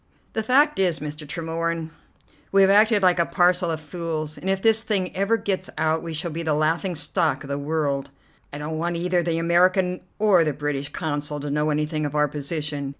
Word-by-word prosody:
"The 220 Hz, -, 0 dB
fact 280 Hz, +5 st, +3 dB
is, 180 Hz, -4 st, +2 dB
Mr. 150 Hz, 0 st, -7 dB
Tremorne, 165 Hz, +1 st, -3 dB, 0.6 s
we 195 Hz, -, +5 dB
have 195 Hz, -, +5 dB
acted 210 Hz, 0 st, +4 dB
like 180 Hz, -1 st, +4 dB
a 170 Hz, -, +3 dB
parcel 180 Hz, 0 st, +2 dB
of 160 Hz, -1 st, -2 dB
fools, 155 Hz, -1 st, -4 dB
and 190 Hz, -, -5 dB
if 195 Hz, 0 st, +1 dB
this 220 Hz, +1 st, +4 dB
thing 200 Hz, -5 st, -1 dB
ever 200 Hz, +4 st, +2 dB
gets 190 Hz, -3 st, -2 dB
out 160 Hz, 0 st, +1 dB
we 170 Hz, -, -6 dB
shall 160 Hz, +2 st, -2 dB
be 165 Hz, +2 st, -4 dB
the 160 Hz, -2 st, 0 dB
laughing 165 Hz, +4 st, 0 dB
stock 155 Hz, +2 st, 0 dB
of 140 Hz, -, -10 dB
the 140 Hz, 0 st, -2 dB
world. 140 Hz, -2 st, -1 dB, 0.4 s
I 145 Hz, -, -6 dB
don't 155 Hz, +2 st, -4 dB
want 170 Hz, +1 st, -1 dB
either 180 Hz, +1 st, +1 dB
the 170 Hz, -1 st, -1 dB
American 180 Hz, +2 st, +2 dB, 0.2 s
or 200 Hz, -5 st, +4 dB
the 155 Hz, -2 st, 0 dB
British 145 Hz, -1 st, -3 dB
Consul 150 Hz, -2 st, -3 dB
to 145 Hz, 0 st, -4 dB
know 150 Hz, +1 st, +1 dB
anything 150 Hz, +1 st, -1 dB
of 145 Hz, -, -7 dB
our 150 Hz, 0 st, +3 dB
position. 145 Hz, 0 st, -4 dB
165 Hz, 210 wpm, -23 LUFS, 150-185 Hz, 0.6 s, we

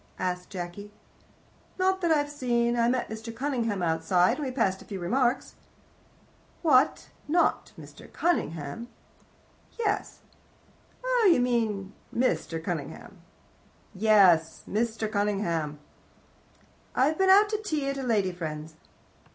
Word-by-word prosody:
asked 180 Hz, 0 st, -3 dB
Jacky. 185 Hz, +3 st, -7 dB, 0.9 s
"Not 380 Hz, 0 st, +1 dB
that 340 Hz, -, +1 dB
I've 290 Hz, -2 st, +3 dB
seen. 240 Hz, -4 st, 0 dB
I 235 Hz, 0 st, +2 dB
met 255 Hz, 0 st, 0 dB
Mr. 220 Hz, +1 st, -6 dB
Cunningham 230 Hz, -7 st, -1 dB
outside, 175 Hz, +2 st, +2 dB
and 300 Hz, -, -3 dB
we -, -, -3 dB
passed 200 Hz, -7 st, 0 dB
a -, -, -13 dB
few 195 Hz, -2 st, -6 dB
remarks." 245 Hz, +7 st, 0 dB, 1.1 s
"What, 290 Hz, -3 st, +3 dB, 0.2 s
not 340 Hz, +4 st, +1 dB
Mr. -, -, -13 dB
Cunnginham?" 165 Hz, -, -2 dB, 0.9 s
"Yes." 420 Hz, -3 st, -2 dB, 0.8 s
"Oh, -, -, +4 dB
you 335 Hz, -, +4 dB
mean 220 Hz, -5 st, 0 dB, 0.2 s
Mr. 235 Hz, -8 st, 0 dB
Cunningham." 165 Hz, -5 st, -6 dB, 0.7 s
"Yes. 185 Hz, -6 st, +4 dB
Mr. 220 Hz, +1 st, -1 dB
Cunningham." 195 Hz, -8 st, -1 dB, 1.2 s
"I've 300 Hz, +6 st, +2 dB
been 380 Hz, 0 st, +4 dB
out 410 Hz, +2 st, +7 dB
to 430 Hz, 0 st, -2 dB
tea 310 Hz, -9 st, -2 dB
at 275 Hz, 0 st, -2 dB
a -, -, -3 dB
lady 215 Hz, -7 st, +1 dB
friend's." 155 Hz, -2 st, -6 dB
230 Hz, 120 wpm, -27 LUFS, 180-280 Hz, 1.2 s, out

